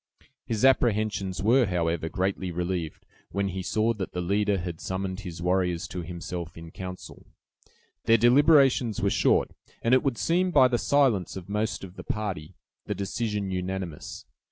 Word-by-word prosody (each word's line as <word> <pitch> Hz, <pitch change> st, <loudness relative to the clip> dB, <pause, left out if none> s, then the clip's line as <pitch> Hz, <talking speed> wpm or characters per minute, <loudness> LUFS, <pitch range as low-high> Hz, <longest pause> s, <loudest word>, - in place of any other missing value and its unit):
His 115 Hz, +2 st, +1 dB
apprehensions 105 Hz, -7 st, +2 dB
were, 120 Hz, +2 st, +4 dB
however, 85 Hz, -2 st, -1 dB
greatly 95 Hz, +1 st, -1 dB
relieved, 85 Hz, -2 st, -3 dB, 0.2 s
when 100 Hz, 0 st, -1 dB
he 95 Hz, 0 st, -4 dB
saw 110 Hz, +4 st, +1 dB
that 100 Hz, -4 st, -5 dB
the 90 Hz, -, -3 dB
leader 100 Hz, +3 st, +1 dB
had 85 Hz, -2 st, -5 dB
summoned 95 Hz, 0 st, -3 dB
his 85 Hz, -4 st, -7 dB
warriors 90 Hz, -2 st, 0 dB
to 90 Hz, -, -4 dB
himself 85 Hz, 0 st, -6 dB
in 80 Hz, 0 st, -10 dB
counsel. 90 Hz, 0 st, -9 dB, 0.8 s
Their 115 Hz, +1 st, +6 dB
deliberations 130 Hz, -2 st, +4 dB
were -, -, +1 dB
short, -, -, +2 dB, 0.3 s
and 115 Hz, -, +3 dB
it 130 Hz, -, +6 dB
would 135 Hz, -5 st, -1 dB
seem, 180 Hz, +7 st, +1 dB
by 130 Hz, -7 st, +5 dB
the 120 Hz, -2 st, +1 dB
silence 130 Hz, -10 st, +2 dB
of 95 Hz, 0 st, -8 dB
most 105 Hz, 0 st, -2 dB
of 95 Hz, -1 st, -10 dB
the -, -, -7 dB
party, 100 Hz, -8 st, -4 dB, 0.3 s
the -, -, -2 dB
decision 105 Hz, -1 st, -2 dB
unanimous. 90 Hz, -3 st, -5 dB
95 Hz, 160 wpm, -27 LUFS, 90-115 Hz, 0.8 s, Their